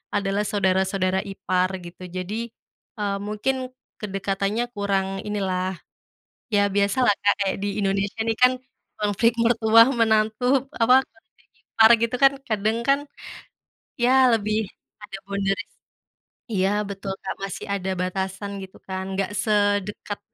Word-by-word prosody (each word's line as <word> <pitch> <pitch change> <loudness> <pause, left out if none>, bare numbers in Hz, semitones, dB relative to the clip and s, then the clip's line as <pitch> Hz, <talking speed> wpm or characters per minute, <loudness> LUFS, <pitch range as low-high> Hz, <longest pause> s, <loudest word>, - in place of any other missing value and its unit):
adalah 200 +1 0
saudara-saudara 190 -1 +1
ipar 185 -1 0 0.2
gitu, 175 +1 -11
jadi, 185 +3 -4 0.7
eee, 200 -1 -1
mungkin 215 +6 -1 0.5
kedekatannya 195 +2 -1
kurang 200 -2 0 0.2
inilah, 190 -3 -2 0.8
ya 205 - +4
biasalah 205 +4 +3
Kak, 205 - +5
kayak 190 - -1
di 205 - 0
Indonesia 200 +2 -1
nih 225 -1 0
kan, 250 0 +7 0.4
konflik 210 +3 +2
mertua, 230 -1 +6 0.2
menantu, 220 +1 +2 0.4
apa 250 +3 +6 0.2
konflik 225 -1 -30
ipar 220 0 +4
gitu 230 +2 0
kan 275 - +7 0.2
kadang 215 +1 0
kan, 275 +1 +4 1.0
ya 245 - +4 0.2
lebih 215 0 0 0.5
ada 205 -1 -7
boundaries 200 0 -2 0.8
iya 190 -1 +2 0.2
betul 195 0 -5
Kak, 190 - -4
masih 195 - -5
ada 190 -1 -4
batasan 190 +2 -3
gitu 190 - -12
kan, 190 0 -4 0.2
gak 195 +1 -1
sedekat 205 -1 0
200 Hz, 125 wpm, -24 LUFS, 195-215 Hz, 1.0 s, kan